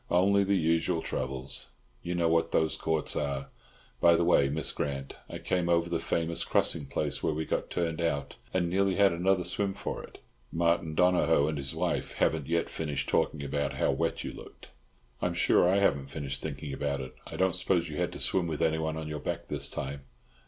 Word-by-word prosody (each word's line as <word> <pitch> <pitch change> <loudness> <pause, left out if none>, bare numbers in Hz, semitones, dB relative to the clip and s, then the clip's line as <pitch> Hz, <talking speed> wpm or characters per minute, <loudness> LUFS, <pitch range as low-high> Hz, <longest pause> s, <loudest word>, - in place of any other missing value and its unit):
"Only 100 +3 +4
the 100 0 +2
usual 80 0 +1
troubles. 65 +1 -3 0.3
You 90 +1 -3
know 85 -1 +2
what 80 0 +2
those 80 -1 +2
courts 80 -1 0
are. 70 -2 -2 0.5
By 85 0 +6
the 85 - +2
way, 80 -5 +4
Miss 80 +3 0
Grant, 70 -1 -3 0.2
I - - -5
came 90 -1 0
over 85 0 +2
the 85 - +1
famous 85 0 -1
crossing 75 -4 0
place 70 - -2
where 75 - 0
we 80 +1 -2
got - - -2
turned 85 -1 -1
out, 75 -4 -1 0.2
and 90 -2 +1
nearly 95 +2 +2
had 100 -2 +5
another 90 +2 +2
swim 95 +3 -1
for - - -4
it. - - -12 0.3
Martin 85 -1 +1
Donohoe 85 -4 +4
and 75 - -2
his 70 0 -3
wife - - -1
haven't 80 -4 +1
yet 85 0 +1
finished 75 -3 -3
talking 75 -2 +1
about 70 +1 -1
how - - +1
wet 80 +5 -1
you - - -5
looked." - - -12 0.5
"I'm - - 0
sure 90 - +4
I 95 - +4
haven't 70 -9 +2
finished 70 -3 -4
thinking 70 -2 -5
about 70 0 -1
it. 65 -1 -6
I - - -7
don't 95 -1 +2
suppose 90 -2 +1
you 75 -1 -6
had - - 0
to - - -7
swim 90 -3 +1
with 80 -2 -1
anyone 80 0 0
on 80 -1 -4
your 75 0 -4
back - - -4
this - - -2
time?" 70 +1 -5
80 Hz, 205 wpm, -29 LUFS, 70-85 Hz, 0.5 s, By